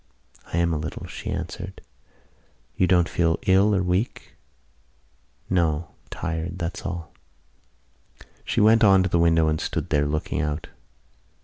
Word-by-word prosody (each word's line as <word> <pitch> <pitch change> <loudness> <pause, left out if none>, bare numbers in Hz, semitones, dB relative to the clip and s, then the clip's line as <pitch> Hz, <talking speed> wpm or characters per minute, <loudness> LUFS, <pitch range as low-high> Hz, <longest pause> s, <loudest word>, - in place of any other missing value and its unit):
"I - - -1
am 85 -1 +2
a 75 - -1
little," 75 - -6
she - - -7
answered. - - -5 1.0
"You 90 - +2
don't 90 -1 +4
feel 85 -1 +1
ill 100 +2 +4
or 95 - +1
weak?" 90 +6 -2 1.1
"No, 85 -3 0 0.2
tired: 85 +2 -4
that's 85 0 -4
all." 85 -3 -6 1.3
She - - -1
went 110 +2 +5
on 95 -2 +6
to 95 - -1
the 85 - +2
window 80 -1 +4
and 75 0 0
stood - - -3
there, 75 0 +2
looking 75 0 -2
out. 75 +1 -3
85 Hz, 140 wpm, -24 LUFS, 80-95 Hz, 1.3 s, on